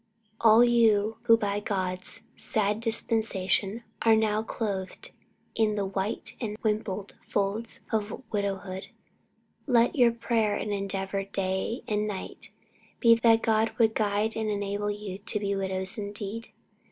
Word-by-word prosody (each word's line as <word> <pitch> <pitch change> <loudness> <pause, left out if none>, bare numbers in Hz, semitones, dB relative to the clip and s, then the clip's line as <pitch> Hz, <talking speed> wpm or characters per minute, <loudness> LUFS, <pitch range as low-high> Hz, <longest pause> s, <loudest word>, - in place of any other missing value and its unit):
All 225 +1 +7
you 225 -3 +3
who 230 -1 +7
by 205 -2 -1
God's 185 +1 -2
sad 210 0 0
dispensation 220 -2 0 0.2
are 225 -1 +5
now 215 -1 +2
clothed 200 -4 -4 0.4
in 215 -2 +1
the 200 -1 -1
"white 195 +2 -3
and 215 -3 -3
wimpled 210 -2 -2
folds" 205 +3 -2
of 220 +3 -2
widowhood, 195 -2 -3 0.8
let 240 -2 +4
your 245 -3 +5
prayer 230 -2 0
and 210 - -3
your 200 - -1
endeavour 195 0 -2
day 195 +4 -2
and 210 0 0
night 200 -3 -6 0.5
be 230 -2 +7
that 230 0 +4
God 220 0 +2
would 225 -2 +4
guide 210 +1 0
and 220 -1 -1
enable 205 0 -2
you 205 -2 -5
to 210 +1 -1
be 200 -1 -1
widows 190 0 -2
indeed. 205 +2 -5
210 Hz, 140 wpm, -28 LUFS, 200-225 Hz, 0.8 s, All